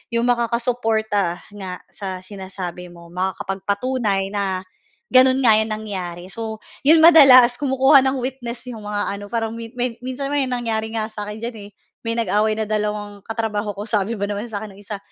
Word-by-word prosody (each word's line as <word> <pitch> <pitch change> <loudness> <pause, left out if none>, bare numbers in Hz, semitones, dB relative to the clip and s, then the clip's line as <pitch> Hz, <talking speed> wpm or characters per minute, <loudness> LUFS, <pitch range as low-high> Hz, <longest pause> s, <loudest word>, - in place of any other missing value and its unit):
yung 235 - +2
makakasuporta 225 -5 +1 0.2
nga 185 -3 -7
sa 185 -2 -6
sinasabi 185 -2 -7
mo, 170 -1 -14
makakapagpatunay 195 +3 -1
na 195 -2 -1 0.5
gano'n 260 +1 +6
nga 220 -3 +6
yung 220 0 -1
nangyari. 185 -4 -6
So, 220 -1 -6 0.2
yon 320 +1 +7
madalas 260 -7 +8
kumukuha 270 0 +5
ng 265 +1 0
witness 250 -2 -5
yung 215 -3 -8
mga 205 0 -1 0.2
ano, 205 - -8
parang 225 -1 -1
may 230 -1 -8 0.3
minsan 260 +2 -4
may 285 -2 +1
nangyari 225 -3 -2
nga 215 -1 -1
sa 210 -1 -6
akin 210 +1 -6
diyan, 235 -1 -4
eh, - - -28 0.3
may 230 0 -1
nag-away 215 0 +1
na 220 - -1
dalawang 210 -1 -3
katrabaho 215 -3 -2
ko 205 - -4
sabi 215 0 0
ba 200 - -1
naman 205 +3 -4
sa 210 - -4
akin 210 -2 -9
nung 200 - -15
isa, 205 0 -6
215 Hz, 175 wpm, -21 LUFS, 200-240 Hz, 0.5 s, madalas